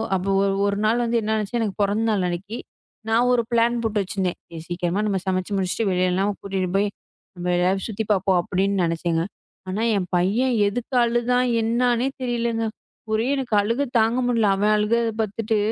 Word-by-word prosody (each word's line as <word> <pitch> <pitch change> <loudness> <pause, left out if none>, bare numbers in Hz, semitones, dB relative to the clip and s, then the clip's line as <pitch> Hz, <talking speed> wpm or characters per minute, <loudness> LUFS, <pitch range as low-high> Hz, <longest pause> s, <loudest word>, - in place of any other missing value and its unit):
அப்ப 185 0 -2 0.2
ஒரு 195 0 +1
ஒரு 200 0 0
நாள் 235 +3 +2
வந்து 235 0 +1
என்ன 220 +1 0
ஆச்சு? 215 +3 -2
எனக்குப் 210 -2 -2
பொறந்தநாள் 210 -1 +1
அன்னைக்கு 200 +6 -5 0.5
நான் 235 +3 +3
ஒரு 235 - +2
ப்ளேன் 235 +1 +2
போட்டு 215 -2 0
வச்சிருந்தேன். 185 -1 -2 0.3
சீக்கிரமா 175 +2 -1
நம்ம 195 -2 0
சமைச்சு 185 +1 -1
முடிச்சு 190 +4 -1
வெளிலலாம் 185 +2 +1
கூட்டிட்டு 190 -2 -2
போய்நம்ப 195 -2 -4
எதாவது 190 +2 +1
சுத்தி 220 0 -3
பாப்போம் 190 -2 +2
அப்படின்னு 195 +2 0
நினைச்சேங்க. 165 0 0 0.5
ஆனா 195 +4 -2 0.2
என் 185 - -2
பையன் 220 +9 +1
எதுக்கு 245 +5 -3
அழுதான் 240 +1 +1
என்னன்னே 240 +2 +1 0.2
தெரியலைங்க. 235 -2 -1 0.5
ஒரே 220 +1 +1
எனக்கு 260 -4 -4
அழுகை 230 +7 0
தாங்க 225 +3 +2
முடியல. 230 -4 +2
அவன் 210 +2 +2
அழுகை 210 +3 +2 0.2
பாத்துட்டு 220 +1 -1
210 Hz, 160 wpm, -23 LUFS, 190-235 Hz, 0.5 s, நான்